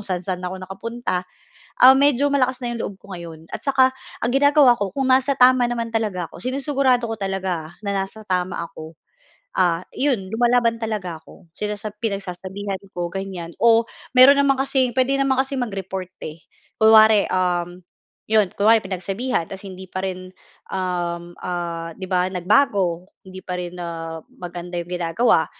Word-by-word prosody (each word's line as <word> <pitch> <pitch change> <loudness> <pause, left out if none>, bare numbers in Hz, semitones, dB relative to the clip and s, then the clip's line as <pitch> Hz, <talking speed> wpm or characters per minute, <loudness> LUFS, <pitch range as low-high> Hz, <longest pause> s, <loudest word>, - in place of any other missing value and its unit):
saan-saan 180 -1 -3
ako 190 - -6
nakapunta, 195 0 -4 0.6
ah, 260 - +11
medyo 285 0 +3
malakas 255 -2 +2
na 240 - -2
yung 230 - -5
loob 200 - -4
ko 200 - -13
ngayon. 165 -2 -9
At - - -4
tsaka, 260 -2 +3 0.3
ang 240 - +1
ginagawa 285 -2 +5
ko 200 - 0
kung 270 -1 0
nasa 265 +1 +3
tama 250 -1 +5
naman 230 -1 -3
talaga 205 -6 -1
ako, - - -11
sinusugurado 260 -1 +1
ko 225 - -2
talaga 190 -5 -2
ah, - - -15
na 200 - -1
nasa 205 +3 -6
tama 185 -1 -1
ako, 160 -1 -11 0.6
ah, 170 -1 +2 0.2
yun 240 -9 0
lumalaban 235 0 +2
talaga 200 -7 -3
ako. 165 +1 -18
Sinasa 210 0 -3
pinagsasabihan 195 -1 -4 0.2
ko 175 -1 -3
ganiyan 190 -3 -6
o 230 -1 +5 0.3
meron 265 +3 +8
naman 275 -1 +4
kasing 260 -3 +1
pwede 265 +1 +2
naman 270 -1 +2
kasing 270 0 -5
mag-report, 190 -2 -5
eh. 155 +1 -7 0.4
Kunwari, 220 -1 +7
uhm, 180 -1 0 0.5
'yon 215 -3 +3
kunwari 220 +2 +4
pinagsabihan 195 +2 -2
tapos 195 0 -8
hindi 190 0 -9
pa 185 +1 -5
rin, 185 -1 -5 0.4
uhm, 175 -2 -3
ah, 170 -2 -4
'di 190 +2 -7
ba 180 0 +2
nagbago, 185 -2 +1 0.2
hindi 190 0 -11
pa 180 - -4
rin 175 0 -6
ah 165 -1 -5 0.2
maganda 175 0 -6
'yong 175 - -15
ginagawa, 175 +6 +2
195 Hz, 160 wpm, -22 LUFS, 180-240 Hz, 0.6 s, ah